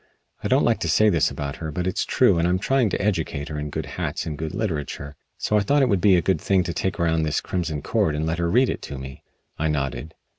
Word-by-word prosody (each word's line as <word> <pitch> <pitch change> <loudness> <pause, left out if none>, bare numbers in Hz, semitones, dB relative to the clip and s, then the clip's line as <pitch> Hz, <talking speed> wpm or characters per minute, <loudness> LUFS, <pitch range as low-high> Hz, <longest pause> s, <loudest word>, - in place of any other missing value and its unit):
I - - 0
don't - - +3
like - - +2
to - - -2
say 110 0 +5
this 85 -7 +3
about 70 -1 -5
her, 80 -1 -5
but 90 +4 -3
it's 95 - -1
true 85 - +3
and 85 - +2
I'm 90 +1 +2
trying 125 +4 +2
to - - -2
educate 80 -7 -1
her 75 -1 -4
in 75 0 -4
good - - -4
hats - - -4
and 80 - -4
good 80 +4 -5
literature. 75 -8 -3 0.2
So 105 - +1
I - - +1
thought 140 +6 +3
it 130 - +2
would 100 -4 +2
be 100 -1 +6
a 85 - +2
good 95 +4 +1
thing 95 -2 +2
to 85 0 -3
take 95 +1 -2
around 80 -1 +2
this 75 -2 0
'Crimson 80 -5 -3
Cord' 75 - +1
and 75 +1 -1
let 80 +1 -1
her 85 0 +1
read 125 +7 +4
it - - -5
to 70 - -7
me." 65 0 -9 0.4
I 80 - +1
nodded. 75 +1 -3
85 Hz, 270 wpm, -24 LUFS, 75-95 Hz, 0.4 s, be